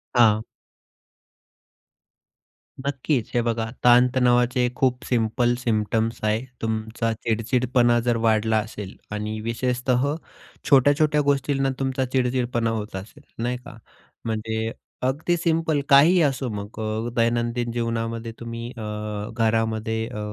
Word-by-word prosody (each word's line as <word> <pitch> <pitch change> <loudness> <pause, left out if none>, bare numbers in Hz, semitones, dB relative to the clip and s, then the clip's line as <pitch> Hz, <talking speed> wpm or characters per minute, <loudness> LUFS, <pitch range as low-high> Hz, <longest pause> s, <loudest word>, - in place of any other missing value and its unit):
हां. 110 -3 +5 2.4
नक्कीच, 130 -2 -1
हे 120 - +2
बघा 115 -1 -1 0.2
ताण-तणावाचे 125 0 +4
खूप 125 -1 +1
सिंपल 120 0 +1
सिम्प्टम्स 110 0 0
आहे. 110 +4 0 0.2
तुमचा 110 +1 -2
चिडचिडपणा 120 +2 +1
जर 120 0 +1
वाढला 110 0 +3
असेल 105 -2 -5 0.2
आणि 105 +1 -3
विशेषतः 125 +4 0 0.5
छोट्या-छोट्या 145 +2 +4
गोष्टींना 140 -1 +1
तुमचा 130 0 0
चिडचिडपणा 125 -2 0
होत 110 -3 -4
असेल 95 +3 -9 0.2
नाही 125 +1 -1
का? 115 - -11 0.5
म्हणजे 110 0 -2 0.3
अगदी 145 +7 +1
सिंपल 160 -2 +1
काहीही 155 +6 +7
असो 135 -4 +1
मग 105 +2 -7
अ, 110 +2 -2
दैनंदिन 120 0 0
जीवनामध्ये 115 -1 -2
तुम्ही 115 0 -6
अ, 110 - -6 0.5
घरामध्ये 110 -1 0
अ, 105 - -7
120 Hz, 110 wpm, -24 LUFS, 110-130 Hz, 2.4 s, काहीही